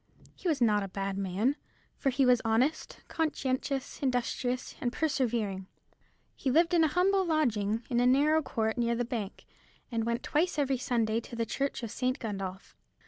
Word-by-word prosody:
He - - -6
was 300 -6 +1
not 210 -2 +3
a 195 - -3
bad 195 +1 -3
man, 200 +8 0 0.4
for 275 - 0
he 270 +1 +2
was 250 -2 +5
honest, 240 +7 0
conscientious, 275 -4 -2
industrious, 250 -1 -1
and 240 - 0
persevering. 235 -10 -1 0.7
He 270 - -2
lived 330 +6 +3
in 335 -2 +5
a - - +5
humble 380 +5 +2
lodging, 230 - +1
in 240 -3 +1
a 245 - +4
narrow 295 +5 +4
court 220 -4 -1
near 235 0 +1
the 245 +1 -1
bank, 225 -5 -5 0.5
and 230 -1 0
went 235 +1 -1
twice 315 +2 0
every 275 -3 +1
Sunday 230 -3 +1
to 235 +1 -9
the 230 0 -1
church 275 +2 -2
of 225 - -4
St. 255 +1 -1
Gundolph. 195 -5 -6
245 Hz, 175 wpm, -30 LUFS, 220-280 Hz, 0.7 s, was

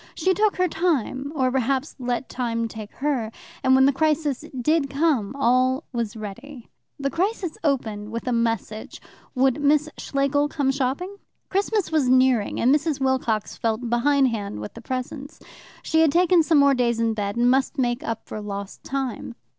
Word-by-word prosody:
She 375 - +2
took 420 +2 +2
her 365 0 +2
time, 290 -5 -1
or 260 -3 +1
perhaps 265 +2 -1
let 245 +1 -2
time 230 -2 -2
take 215 -1 -9
her, 260 -6 -1 0.3
and 260 0 +5
when 265 0 +6
the 280 - +4
crisis 300 -2 0 0.2
did 295 +2 +1
come 275 -6 0
all 255 +2 +2
was 230 -2 -3
ready. 235 +5 -9 0.3
The 275 0 -1
crisis 370 -1 -1
opened 220 -8 -1
with 230 +3 -5
a - - +1
message: 230 -2 -2 0.4
would 265 +2 +2
Miss 300 +1 +3
Schlegel 280 +1 +1
come 280 -3 0
shopping? 280 +9 -2 0.3
Christmas 400 -1 0
was 300 -5 +2
nearing, 255 -4 +3
and 255 +4 +4
Mrs. 300 -1 0
Wilcox 260 -5 0
felt 230 +1 -2
behind 270 +2 +3
hand 205 - -4
with 105 0 -7
the - - -10
presents. 265 +3 -5 0.4
She 320 0 +2
had 320 -3 +4
taken 350 +1 +4
some 320 0 +3
more 280 -1 +6
days 240 -3 +1
in 230 -1 +1
bed, 205 -1 -3
and 240 +1 +3
must 265 +3 +1
make 245 -1 0
up 230 -1 -4
for 215 - -6
lost 200 -1 -6
time. 265 -3 -4
265 Hz, 175 wpm, -24 LUFS, 235-290 Hz, 0.4 s, when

